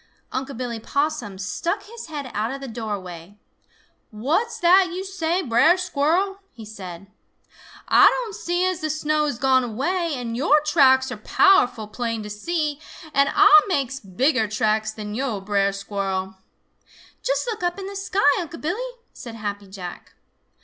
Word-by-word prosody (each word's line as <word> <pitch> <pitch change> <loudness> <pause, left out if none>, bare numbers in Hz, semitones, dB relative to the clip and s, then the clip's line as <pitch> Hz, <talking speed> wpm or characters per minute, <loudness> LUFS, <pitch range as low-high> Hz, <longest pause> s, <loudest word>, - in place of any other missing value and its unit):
Unc' 265 0 -4
Billy 240 -2 -4
Possum 280 -5 -2
stuck 340 - -3
his 460 -1 -10
head 290 -5 -6
out 215 +2 -1
of 270 +2 -5
the 275 - -7
doorway. 200 -5 -6 0.7
"What's 280 - -1
that 365 +1 +5
yo' 370 +2 -4
say, 370 -2 -1
Brer 260 +8 +4
Squirrel?" 365 +3 0
he 225 - -11
said. 190 -4 -9 0.8
"Ah - - +7
don' 475 -4 -3
see 360 -4 -1
as 370 -2 -1
the 310 - -2
snow 305 0 0
has 250 -5 -3
gone 260 0 +3
away, 320 - -1
and 240 -2 -4
your 290 +4 +4
tracks 270 -4 +4
are 250 - -5
powerful 245 - +3
plain 230 0 -3
to 210 - -7
see, 300 +6 -2 0.3
and 280 0 +3
Ah 405 +1 +8
makes 275 -7 -1
bigger 220 - +1
tracks 215 +1 0
than 210 -1 -7
yo', 240 -3 -2
Brer 200 0 +1
Squirrel." 195 -1 -3 0.9
"Just - - 0
look 455 -5 -4
up 350 0 -1
in 390 - -6
the 400 +1 -7
sky, 390 -7 +2
Unc' 335 -2 -6
Billy!" 460 +11 -3 0.2
said 235 -2 -9
Happy 205 -2 -5
Jack. 185 -2 -9
270 Hz, 160 wpm, -23 LUFS, 215-345 Hz, 0.9 s, Ah